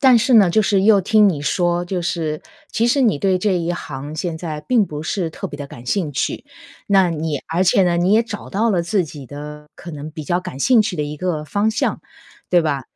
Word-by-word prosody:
但 255 -4 +6
是 245 +2 +2
呢， 200 -5 +6
就 215 - +3
是 195 -1 +2
又 205 -1 +5
听 210 +2 +4
你 150 -6 -2
说， 175 +3 0
就 180 -1 -3
是 160 -3 -2 0.3
其 230 +2 +1
实 275 +4 +2
你 215 - +2
对 190 +1 +1
这 190 -1 +1
一 170 0 -1
行 145 -2 -7
现 165 0 -3
在 160 -2 -5
并 225 +6 +2
不 150 -4 -7
是 170 0 -2
特 - - -6
别 145 - -8
地 145 - -7
感 120 +1 -12
兴 175 0 -1
趣。 135 - -2 0.4
那 195 -2 +4
你 155 -2 -2
而 170 +3 +1
且 190 +1 +4
呢， 175 -1 +1
你 180 +4 +2
也 225 - +5
找 220 -3 -8
到 220 +4 +1
了 180 -4 +1
自 185 +1 0
己 145 -3 -10
的 150 +2 -9
可 170 - -9
能 150 +1 -7
比 155 -1 -8
较 175 +5 0
感 135 - -8
兴 230 - +4
趣 205 -4 -3
的 150 - -1
一 150 +1 -6
个 160 -2 -2
方 205 +7 0
向， 225 - -1 0.5
对 175 - +5
吧？ 145 -4 -1
175 Hz, 260 characters per minute, -20 LUFS, 150-200 Hz, 0.5 s, 但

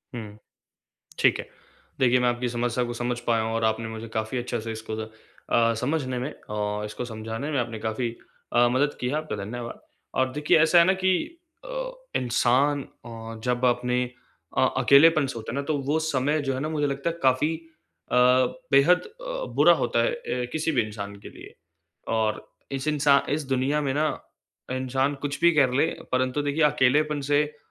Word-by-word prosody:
हुँ। 105 -3 -7 0.8
ठीक - - +4
है। - - -7 0.5
देखिए 125 -1 +4
मैं 125 - +3
आपकी 120 0 -1
समस्या 120 +1 -1
को 120 - -4
समझ 120 +1 -2
पाया 115 -1 +2
हूँ। 110 0 -2
और 115 0 0
आपने 110 +1 0
मुझे 110 +1 -7
काफ़ी 110 +3 -3
अच्छे 120 -1 -3
से 115 +1 -5
इसको 110 0 -6
द 110 - -14 0.4
अ, 115 0 +4
समझने 130 +1 -1
में 130 +5 -4 0.2
और 105 0 -2
इसको 105 +3 -5
समझाने 115 +4 -5
में 145 - 0
आपने 115 -2 -4
काफ़ी 110 +2 -2 0.4
अ, 120 0 +5
मदद 135 +4 +1
की 125 - -1
है, 135 - -2
आपका 155 -7 -3
धन्यवाद। 120 +3 -6 0.3
और 130 0 +1
देखिए 150 +3 +3
ऐसा 160 +2 +5
है 170 - +8
ना 185 - +4
कि 190 0 +4 0.5
अ, - - -4 0.3
इंसान 130 +4 +2
अ, 115 -3 -10
जब 125 0 0
अपने 125 0 +2 0.6
अ, - - +5
अकेलेपन 155 +1 +6
से 130 - -5
होता 110 0 -6
है - - -4
ना 140 - -1
तो 155 - +2
वो 155 +2 +2
समय 145 +2 +1
जो 135 - +1
है 130 - -3
ना 155 - -2
मुझे 150 -2 0
लगता 140 +4 -2
है 170 - -7
काफ़ी 135 +5 +3
अ, 105 - -9 0.6
बेहद 150 +6 +5
अ, - - -6
बुरा - - +7
होता - - +1
है - - +1
अ, 300 - -3
किसी 160 +1 0
भी 125 -5 +3
इंसान 100 -2 -7
के - - -10
लिए। - - -13 0.6
और 110 -1 -1 0.3
इस 135 +1 -3
इंसा 145 -2 +4
इस 150 +1 -1
दुनिया 135 +3 +1
में 140 -2 -1
ना 150 +2 +2 0.7
इंसान 130 +2 0
कुछ 145 -1 -3
भी 170 +1 +6
कर 135 -4 +4
ले 145 - +3 0.3
परंतु 130 +3 +1
देखिए 145 +2 0
अकेलेपन 150 +1 +3
से 145 +1 +5
अ, 150 0 -11
130 Hz, 195 wpm, -25 LUFS, 115-150 Hz, 0.8 s, है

